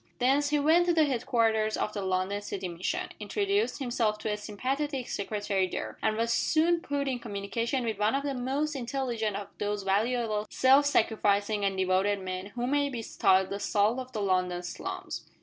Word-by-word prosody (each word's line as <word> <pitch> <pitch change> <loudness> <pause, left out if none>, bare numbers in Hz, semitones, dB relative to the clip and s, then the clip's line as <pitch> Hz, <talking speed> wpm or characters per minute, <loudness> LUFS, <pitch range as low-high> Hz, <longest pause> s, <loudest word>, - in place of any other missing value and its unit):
Thence 275 +3 +2
he 295 - +2
went 320 +5 +4
to 345 - +4
the 320 - +5
headquarters 225 -4 +1
of 210 - -2
the 205 - -3
London 190 +2 -1
City 200 -2 -4
Mission; 175 +1 -3
introduced 405 +1 0
himself 235 -5 0
to 215 0 -3
a - - 0
sympathetic 260 +6 -3
secretary 200 -2 -1
there, - - -5
and 215 0 +1
was 230 +1 +1
soon 330 +6 +2
put 285 -3 -2
in 255 -2 -1
communication 230 +4 -2
with 220 -3 -2
one 210 +4 +2
of 280 - -1
the 285 -1 -1
most 275 +4 -1
intelligent 240 -5 -2
of 200 -1 -5
those 205 -1 -2
valuable 215 +2 0
self 270 +2 +5
sacrificing 210 -4 +2
and 195 -1 0
devoted 190 +2 +2
men 185 0 -5
who 240 +4 -4
may 285 +2 +1
be 240 -4 -5
styled 190 -2 +3
the 200 - -3
salt 210 +5 +1
of 255 0 -7
the 215 - -3
London 180 -2 0
slums. 175 - -6
220 Hz, 185 wpm, -29 LUFS, 200-270 Hz, -, the